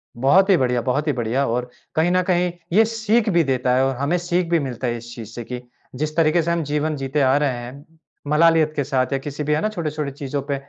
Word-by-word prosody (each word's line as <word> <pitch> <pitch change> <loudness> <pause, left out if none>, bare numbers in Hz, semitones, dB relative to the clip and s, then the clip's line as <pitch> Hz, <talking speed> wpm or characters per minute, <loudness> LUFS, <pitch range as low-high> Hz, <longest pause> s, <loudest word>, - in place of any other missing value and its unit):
बहुत 160 - +4
ही 195 - +7
बढ़िया, 125 -2 +1
बहुत 135 +6 -1
ही 150 - +2
बढ़िया 125 +2 0
और 125 +1 -2 0.3
कहीं 160 +3 +2
न 185 0 +3
कहीं 180 -1 +1 0.2
ये 220 +4 +6
सीख 225 0 0
भी 170 -3 +3
देता 130 -3 +1
है 130 +1 +3
और 135 0 -1
हमें 140 +7 0
सीख 175 0 -1
भी 170 -1 +3
मिलता 130 -3 -4
है 120 0 -1
इस 120 +1 -10
चीज़ 115 -3 -8
से 120 - -5
कि 125 +1 -6 0.3
जिस 155 +3 -3
तरीके 165 +1 +3
से 170 +1 -1
हम 170 -1 0
जीवन 150 +1 -1
जीते 135 +2 -1
आ 130 0 +4
रहे 145 -1 +1
हैं, 125 +4 -8 0.4
मलालियत 155 0 +4
के 145 - 0
साथ 130 -1 0
या - - +2
किसी 145 +2 -5
भी 150 +1 0
है 150 - +1
ना 215 - 0
छोटे-छोटे 155 -7 -3
चीज़ों 140 0 -4
पे 140 - +1
145 Hz, 255 wpm, -21 LUFS, 130-170 Hz, 0.4 s, ही